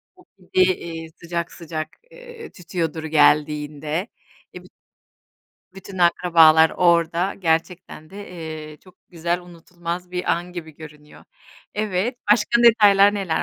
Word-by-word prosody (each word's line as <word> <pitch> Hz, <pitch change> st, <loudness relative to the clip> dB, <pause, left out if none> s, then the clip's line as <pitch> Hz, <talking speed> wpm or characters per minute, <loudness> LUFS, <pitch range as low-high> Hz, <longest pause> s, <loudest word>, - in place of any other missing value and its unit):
O 365 Hz, -, -21 dB
pide, 185 Hz, 0 st, +1 dB
iii, 165 Hz, -1 st, -8 dB
sıcak 170 Hz, 0 st, -5 dB
sıcak, 155 Hz, -2 st, -6 dB, 0.2 s
eee, 480 Hz, -2 st, -12 dB
tütüyordur 165 Hz, -3 st, -4 dB
geldiğinde. 150 Hz, +2 st, +1 dB, 0.5 s
E, -, -, -10 dB
büt -, -, -19 dB, 1.0 s
bütün 195 Hz, 0 st, -10 dB
akrabalar 165 Hz, -2 st, +5 dB
orada 170 Hz, +1 st, +1 dB
gerçekten 165 Hz, -2 st, -3 dB
de, 200 Hz, 0 st, -10 dB
eee, 155 Hz, -3 st, -8 dB
çok 185 Hz, +3 st, -21 dB
güzel 170 Hz, 0 st, -2 dB
unutulmaz 175 Hz, 0 st, -8 dB
bir 180 Hz, 0 st, -1 dB
an 175 Hz, +1 st, -4 dB
gibi 160 Hz, -4 st, -9 dB
görünüyor. 150 Hz, -1 st, -14 dB, 0.5 s
Evet, 210 Hz, +3 st, -2 dB
başka 235 Hz, +2 st, +3 dB
detaylar 205 Hz, -3 st, +6 dB
neler 190 Hz, -6 st, -1 dB
175 Hz, 120 wpm, -21 LUFS, 160-185 Hz, 1.0 s, detaylar